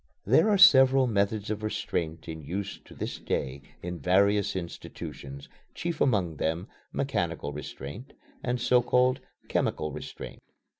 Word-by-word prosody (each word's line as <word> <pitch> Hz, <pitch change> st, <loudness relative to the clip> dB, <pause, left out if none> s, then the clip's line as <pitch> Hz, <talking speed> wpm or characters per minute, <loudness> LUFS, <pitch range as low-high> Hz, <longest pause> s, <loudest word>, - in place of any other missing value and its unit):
There 135 Hz, -, +5 dB
are 205 Hz, -, +4 dB
several 135 Hz, -6 st, +8 dB
methods 105 Hz, -2 st, 0 dB
of 110 Hz, 0 st, -3 dB
restraint 85 Hz, -6 st, -3 dB
in 80 Hz, -1 st, -6 dB
use 95 Hz, +6 st, -4 dB
to -, -, -14 dB
this -, -, -4 dB
day 70 Hz, +1 st, -2 dB, 0.2 s
in 90 Hz, 0 st, -4 dB
various 100 Hz, +5 st, +3 dB
institutions, 70 Hz, -5 st, -7 dB, 0.3 s
chief 170 Hz, -2 st, -3 dB
among 95 Hz, -, +2 dB
them 80 Hz, +4 st, -1 dB, 0.2 s
"mechanical 70 Hz, -, -2 dB
restraint" 75 Hz, -, -8 dB, 0.3 s
and 125 Hz, 0 st, -1 dB
so 125 Hz, 0 st, +4 dB
called 125 Hz, +2 st, +3 dB, 0.3 s
"chemical 75 Hz, 0 st, 0 dB
restraint." -, -, -8 dB
100 Hz, 135 wpm, -28 LUFS, 80-125 Hz, 0.3 s, several